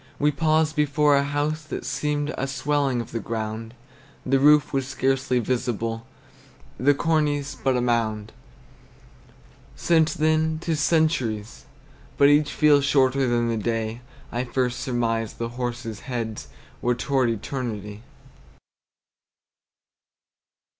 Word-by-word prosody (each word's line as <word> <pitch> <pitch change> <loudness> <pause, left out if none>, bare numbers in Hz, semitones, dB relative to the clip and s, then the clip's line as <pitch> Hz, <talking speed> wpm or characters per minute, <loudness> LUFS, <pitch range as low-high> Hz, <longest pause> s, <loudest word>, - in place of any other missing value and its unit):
We 150 +1 +2
paused 155 +1 +1
before 150 -1 +3
a 140 - +4
house 145 +2 -1
that 155 - -6
seemed 150 0 -2
A 135 - -2
swelling 135 -1 0
of 115 - -9
the 115 - -3
ground; 110 +1 -5 0.5
The 135 +1 +2
roof 150 +1 +5
was 135 -1 0
scarcely 130 -1 0
visible, 115 -2 -2 0.7
The 145 +3 +4
cornice 145 -2 0
but 130 -2 0
a - - 0
mound. 110 -3 -1 1.4
Since 160 -2 +2
then 155 +1 +1
't 165 +1 -4
is 155 - 0
centuries; 145 -10 0 0.5
but 140 - +6
each 145 +1 +3
Feels 145 -2 +4
shorter 135 -1 +3
than 120 -1 +1
the 115 - -1
day 115 +1 -2 0.3
I 120 +1 -1
first 125 0 -1
surmised 115 -4 -1
the 115 0 -3
horses' 120 -2 -5
heads 115 -4 -5 0.3
Were 125 0 +1
toward 130 0 +1
eternity. 110 -3 -4
130 Hz, 125 wpm, -24 LUFS, 115-145 Hz, 1.4 s, but